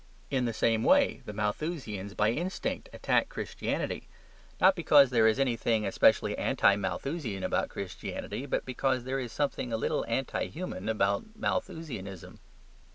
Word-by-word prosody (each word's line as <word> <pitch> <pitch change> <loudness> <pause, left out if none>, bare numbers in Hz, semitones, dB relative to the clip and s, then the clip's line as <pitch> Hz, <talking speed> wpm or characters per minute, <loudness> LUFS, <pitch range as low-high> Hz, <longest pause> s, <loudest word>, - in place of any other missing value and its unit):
In 130 -3 +1
the 120 - 0
same 115 0 +1
way - - +4
the - - -4
Malthusians 105 - -3
by 105 +1 +3
instinct 175 +9 -3
attacked - - +1
Christianity; - - -3 0.5
not 190 +1 +6
because 145 -6 +6
there 115 -2 +5
is 110 - +3
anything 115 -4 +1
especially 95 - +3
anti 100 - +3
Malthusian 115 - -3
about - - 0
Christianity, 100 +7 -5
but - - -1
because 130 0 0
there 130 +2 -2
is 125 -3 -5
something 140 -3 -2
a 115 - 0
little - - 0
anti 130 +3 -1
human 155 - -5
about 105 - 0
Malthusianism. 135 - -4
120 Hz, 145 wpm, -30 LUFS, 105-140 Hz, 0.5 s, not